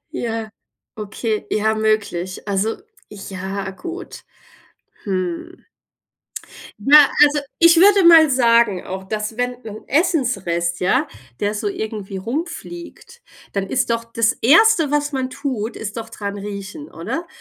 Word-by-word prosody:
Ja, 225 Hz, -2 st, -3 dB, 0.5 s
okay, 215 Hz, +1 st, -4 dB
ja, 220 Hz, +1 st, +1 dB
möglich. 210 Hz, -4 st, -1 dB
Also, 200 Hz, +3 st, 0 dB, 0.4 s
ja, 195 Hz, -1 st, -6 dB
gut. 345 Hz, -, -8 dB, 0.8 s
Hm. 185 Hz, -, -4 dB, 1.2 s
Ja, 295 Hz, +1 st, +8 dB, 0.2 s
also, 295 Hz, 0 st, +1 dB, 0.2 s
ich 335 Hz, 0 st, +6 dB
würde 390 Hz, +2 st, +6 dB
mal 325 Hz, -3 st, +8 dB
sagen 235 Hz, -6 st, +3 dB
auch, 190 Hz, +1 st, -6 dB
dass 215 Hz, +2 st, -4 dB
wenn 245 Hz, 0 st, -2 dB
wenn 215 Hz, 0 st, -7 dB
'n -, -, -25 dB
Essensrest, 200 Hz, -, 0 dB
ja, 180 Hz, -, +1 dB, 0.3 s
der 205 Hz, +1 st, 0 dB
so 210 Hz, 0 st, -3 dB
irgendwie 205 Hz, -1 st, -5 dB
rumfliegt, 340 Hz, -, -7 dB, 0.3 s
dann 195 Hz, -1 st, -2 dB
ist 260 Hz, -, 0 dB
doch 230 Hz, 0 st, -1 dB
das 230 Hz, -1 st, +1 dB
1. 325 Hz, -, +5 dB
was 290 Hz, 0 st, 0 dB
man 260 Hz, -2 st, -2 dB
tut, 255 Hz, -6 st, -4 dB
ist 215 Hz, 0 st, -6 dB
doch 225 Hz, 0 st, -6 dB
dran 205 Hz, -2 st, -6 dB
riechen, 205 Hz, +8 st, -7 dB
oder? 260 Hz, -, -5 dB
225 Hz, 130 wpm, -20 LUFS, 200-290 Hz, 1.2 s, Ja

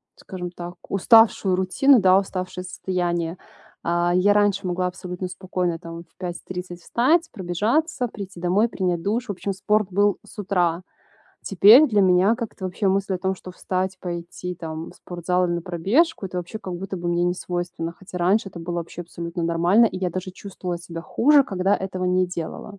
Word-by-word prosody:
скажем 180 Hz, -2 st, -7 dB
так, 175 Hz, 0 st, -8 dB
уставшую 210 Hz, -2 st, +5 dB
рутину, 230 Hz, +9 st, +4 dB
да, 185 Hz, 0 st, +6 dB
уставшее 185 Hz, -2 st, -5 dB
состояние. 175 Hz, -2 st, -2 dB, 0.5 s
Э, 175 Hz, +1 st, +1 dB
я 195 Hz, +3 st, +4 dB
раньше 205 Hz, -1 st, +2 dB
могла 180 Hz, 0 st, 0 dB
абсолютно 180 Hz, 0 st, -5 dB
спокойно 180 Hz, -2 st, -2 dB
там 165 Hz, 0 st, -8 dB
в -, -, -33 dB
5:30 180 Hz, 0 st, -6 dB
встать, 320 Hz, -, +2 dB
пробежаться, 230 Hz, -, 0 dB
прийти 200 Hz, -4 st, -9 dB
домой, 185 Hz, +6 st, +2 dB
принять 180 Hz, -6 st, -1 dB
душ. 230 Hz, +5 st, -1 dB
В -, -, +1 dB
общем, 200 Hz, +1 st, -3 dB
спорт 210 Hz, +2 st, +1 dB
был 205 Hz, +1 st, +2 dB
с -, -, -16 dB
утра. 180 Hz, -4 st, 0 dB, 0.6 s
Теперь 210 Hz, -, +7 dB
для 210 Hz, -6 st, +2 dB
меня 185 Hz, +3 st, +4 dB
как-то 225 Hz, -5 st, -6 dB
вообще 185 Hz, +2 st, -1 dB
мысль 195 Hz, 0 st, 0 dB
о -, -, -2 dB
том, 190 Hz, +1 st, -1 dB
что 185 Hz, -, -11 dB
встать, 185 Hz, +1 st, -3 dB
пойти 175 Hz, 0 st, -5 dB
там 160 Hz, -1 st, -6 dB
в -, -, -17 dB
спортзал 180 Hz, +1 st, -1 dB
или 175 Hz, -, -1 dB
на 170 Hz, -, -3 dB
пробежку- 195 Hz, -, +1 dB
это 180 Hz, -1 st, -4 dB
вообще 180 Hz, +5 st, -6 dB
как 190 Hz, -4 st, -6 dB
будто 190 Hz, +2 st, -5 dB
бы 175 Hz, -1 st, -3 dB
мне 175 Hz, 0 st, +1 dB
не 175 Hz, 0 st, +1 dB
свойственно, 175 Hz, -2 st, -4 dB
хотя 180 Hz, +1 st, -11 dB
раньше 195 Hz, +4 st, +2 dB
это 175 Hz, -, -10 dB
было 175 Hz, +1 st, -4 dB
вообще 170 Hz, +1 st, -5 dB
абсолютно 170 Hz, 0 st, -6 dB
нормально, 170 Hz, +7 st, +4 dB
и 185 Hz, -, -4 dB
я 185 Hz, -1 st, 0 dB
даже 185 Hz, +2 st, -5 dB
чувствовала 185 Hz, -2 st, -6 dB
себя 170 Hz, -1 st, -8 dB
хуже, 280 Hz, -, +4 dB
когда 195 Hz, -3 st, +1 dB
этого 185 Hz, -1 st, -4 dB
не 180 Hz, 0 st, +2 dB
делала. 180 Hz, +3 st, -6 dB
185 Hz, 185 wpm, -23 LUFS, 175-200 Hz, 0.6 s, Теперь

